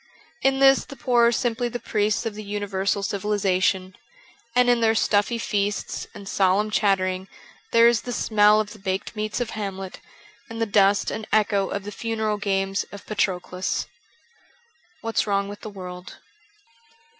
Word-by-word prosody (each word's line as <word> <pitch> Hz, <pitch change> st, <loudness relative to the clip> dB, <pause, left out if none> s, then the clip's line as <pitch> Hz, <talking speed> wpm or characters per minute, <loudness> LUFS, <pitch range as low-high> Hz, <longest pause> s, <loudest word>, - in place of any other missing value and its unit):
In 270 Hz, 0 st, +3 dB
this 270 Hz, 0 st, +5 dB
the 275 Hz, -, -11 dB
poor 240 Hz, -3 st, +3 dB
are -, -, +3 dB
simply 240 Hz, 0 st, -1 dB
the 245 Hz, -, -4 dB
priests 210 Hz, 0 st, 0 dB
of 225 Hz, -, -2 dB
the 215 Hz, +1 st, -8 dB
universal 200 Hz, -1 st, -2 dB
civilization; 190 Hz, -2 st, 0 dB, 0.6 s
and 250 Hz, 0 st, +4 dB
in 240 Hz, -1 st, +3 dB
their 225 Hz, 0 st, +3 dB
stuffy 210 Hz, +2 st, +2 dB
feasts 205 Hz, -2 st, -2 dB
and 200 Hz, -1 st, -10 dB
solemn 195 Hz, +2 st, +2 dB
chattering 190 Hz, -2 st, +1 dB, 0.4 s
there 230 Hz, 0 st, +6 dB
is 235 Hz, -2 st, +3 dB
the 245 Hz, -, -6 dB
smell 210 Hz, -2 st, +4 dB
of 210 Hz, 0 st, -3 dB
the 215 Hz, -, -14 dB
baked 190 Hz, +2 st, -3 dB
meats 215 Hz, +1 st, -2 dB
of 245 Hz, -2 st, -2 dB
Hamlet 195 Hz, -3 st, -5 dB, 0.5 s
and 225 Hz, 0 st, -7 dB
the 225 Hz, -, +2 dB
dust 200 Hz, -1 st, +3 dB
and 220 Hz, -, -5 dB
echo 205 Hz, -2 st, +2 dB
of 200 Hz, -, -3 dB
the 205 Hz, -, -6 dB
funeral 220 Hz, -1 st, -2 dB
games 195 Hz, -1 st, 0 dB
of 200 Hz, -, -10 dB
Patroclus. 185 Hz, -3 st, -1 dB, 0.6 s
' 410 Hz, -8 st, -35 dB
What 225 Hz, -1 st, -1 dB
's -, -, +1 dB
Wrong 200 Hz, -1 st, +1 dB
with 205 Hz, +1 st, -9 dB
the 215 Hz, -, -6 dB
World.' 180 Hz, -2 st, -9 dB
210 Hz, 165 wpm, -24 LUFS, 195-225 Hz, 0.6 s, there